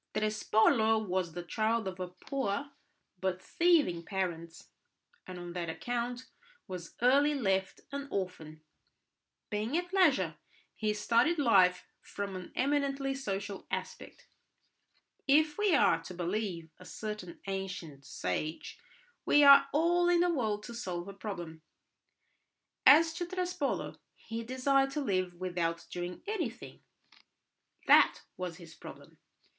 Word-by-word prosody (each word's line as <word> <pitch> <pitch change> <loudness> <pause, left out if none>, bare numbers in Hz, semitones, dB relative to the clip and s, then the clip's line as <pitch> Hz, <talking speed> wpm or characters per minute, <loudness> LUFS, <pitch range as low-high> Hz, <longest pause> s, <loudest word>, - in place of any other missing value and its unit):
Trespolo 220 +1 +3
was 185 -5 -2
the 175 +1 -5
child 220 +4 0
of 185 -1 -6
poor 275 0 -2 0.5
but 185 -1 -1
thieving 310 - +2
parents, 170 -3 -4 0.6
and 185 - -7
on 175 -1 -7
that 170 -2 -3
account 245 +6 -3 0.4
was 180 -3 -8
early 285 +4 +4
left 195 -7 -1
an 280 0 -5
orphan. 160 - -5 0.9
Being 215 +8 -1
at 355 +1 -4
leisure, 265 - +3 0.4
he 215 -1 -1
studied 235 +10 +2
life 185 -9 +4 0.2
from 200 -1 -6
an 185 -1 -8
eminently 275 0 0
social 200 -6 -5
aspect. - - -6 1.0
If 300 +4 +3
we 415 -5 +4
are - - +4
to 180 - -8
believe 175 -2 -3
a 185 - -13
certain 210 -4 -7
ancient 180 -7 -5
sage, 135 - -4 0.4
we 290 - +5
are 280 -1 +9
all 345 +3 +3
in 350 -1 +4
the 355 -1 +2
world 215 -7 -1
to 235 - -8
solve 185 -6 -5
a - - -8
problem: 175 -5 -7 1.3
as 325 +2 +7
to 350 0 -4
Trespolo, 360 -5 -3 0.2
he 225 +1 -6
desired 270 +3 +2
to 300 - -1
live 185 -7 -1
without 175 -2 -2
doing 175 0 -5
anything; 335 - -5 1.0
that - - +5
was 180 -2 -5
his 170 -3 -13
problem. - - -13
210 Hz, 125 wpm, -31 LUFS, 180-275 Hz, 1.3 s, are